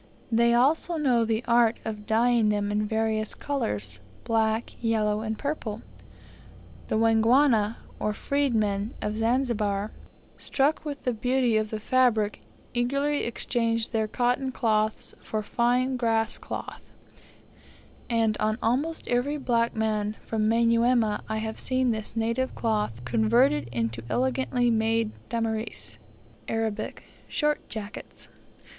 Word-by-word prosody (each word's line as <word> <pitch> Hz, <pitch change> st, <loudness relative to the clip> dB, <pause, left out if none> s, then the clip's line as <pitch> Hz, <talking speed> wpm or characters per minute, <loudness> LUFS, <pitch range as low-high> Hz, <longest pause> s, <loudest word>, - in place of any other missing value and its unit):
They 235 Hz, +1 st, +4 dB
also 310 Hz, +7 st, +2 dB
know 255 Hz, -6 st, +3 dB
the 225 Hz, +1 st, -1 dB
art 235 Hz, -1 st, +4 dB
of 210 Hz, -1 st, -5 dB
dyeing 230 Hz, 0 st, +3 dB
them 205 Hz, -1 st, 0 dB
in 210 Hz, 0 st, 0 dB
various 220 Hz, 0 st, 0 dB
colours 105 Hz, -, -2 dB, 0.2 s
black, 225 Hz, 0 st, 0 dB
yellow, 215 Hz, -2 st, +1 dB
and 220 Hz, 0 st, -3 dB
purple. 240 Hz, -7 st, -4 dB, 1.0 s
The -, -, 0 dB
Wangwana, 225 Hz, 0 st, +4 dB, 0.2 s
or 210 Hz, -, 0 dB
freed 280 Hz, +3 st, 0 dB
men 205 Hz, 0 st, 0 dB
of 210 Hz, 0 st, -2 dB
Zanzibar, 225 Hz, -3 st, 0 dB, 0.5 s
struck 285 Hz, +3 st, +1 dB
with 290 Hz, -2 st, -6 dB
the 250 Hz, -, 0 dB
beauty 245 Hz, +1 st, +1 dB
of 215 Hz, 0 st, +1 dB
the 220 Hz, -, -4 dB
fabric, 225 Hz, -3 st, +2 dB, 0.3 s
eagerly 275 Hz, +4 st, 0 dB
exchange 230 Hz, -1 st, 0 dB
their 220 Hz, -2 st, 0 dB
cotton 250 Hz, +3 st, 0 dB
cloths 215 Hz, -3 st, 0 dB
for 215 Hz, -1 st, -3 dB
fine 250 Hz, +4 st, +1 dB
grass 225 Hz, -2 st, +1 dB
cloth; -, -, -6 dB, 1.3 s
and 225 Hz, -2 st, +2 dB
on 215 Hz, 0 st, +1 dB
almost 280 Hz, +8 st, -1 dB
every 250 Hz, +5 st, 0 dB
black 235 Hz, -4 st, +1 dB
man 215 Hz, -1 st, -1 dB
from 215 Hz, -1 st, 0 dB
Manyuema 230 Hz, -1 st, +3 dB
I 220 Hz, -, -1 dB
have 220 Hz, 0 st, -4 dB
seen 255 Hz, -1 st, +1 dB
this 220 Hz, 0 st, -2 dB
native 230 Hz, +3 st, -1 dB
cloth 210 Hz, -, -1 dB
converted 220 Hz, -, +3 dB
into 115 Hz, -1 st, -2 dB
elegantly 255 Hz, -1 st, +1 dB
made 225 Hz, 0 st, +1 dB, 0.2 s
damirs 225 Hz, -1 st, -3 dB, 0.5 s
(Arabic) 225 Hz, -1 st, -2 dB, 0.2 s
short 300 Hz, -1 st, -1 dB
jackets. 215 Hz, 0 st, -6 dB
225 Hz, 125 wpm, -27 LUFS, 215-245 Hz, 1.3 s, They